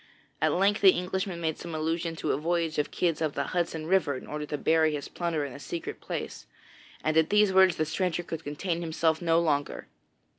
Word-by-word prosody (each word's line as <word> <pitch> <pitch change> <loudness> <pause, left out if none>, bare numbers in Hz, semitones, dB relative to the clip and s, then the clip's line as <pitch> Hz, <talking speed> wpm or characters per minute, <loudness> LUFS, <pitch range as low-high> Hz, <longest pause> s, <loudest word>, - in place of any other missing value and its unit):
At - - +3
length 200 +3 +2
the 190 -2 +8
Englishman 185 0 -3
made 160 -2 -2
some 170 -2 -6
allusion 165 +1 -1
to - - -2
a - - +1
voyage 165 0 -1
of 150 - 0
Kidd's 165 -3 0
up 155 -2 0
the 140 - -1
Hudson 165 -3 -1
river 180 -5 +2
in - - -10
order 150 0 -5
to 150 - -3
bury 160 0 +2
his 145 - -5
plunder 165 -4 -2
in 135 - -7
a 140 - -9
secret 170 +3 -6
place, - - -6 0.6
and 155 - +1
at 160 -1 +4
these 210 -2 +4
words 190 -2 +6
the 155 - 0
stranger 175 +1 -1
could 165 -1 -6
contain 165 +4 -3
himself 160 0 0
no 165 -1 +3
longer. 145 -4 -1
165 Hz, 215 wpm, -28 LUFS, 155-175 Hz, 0.6 s, the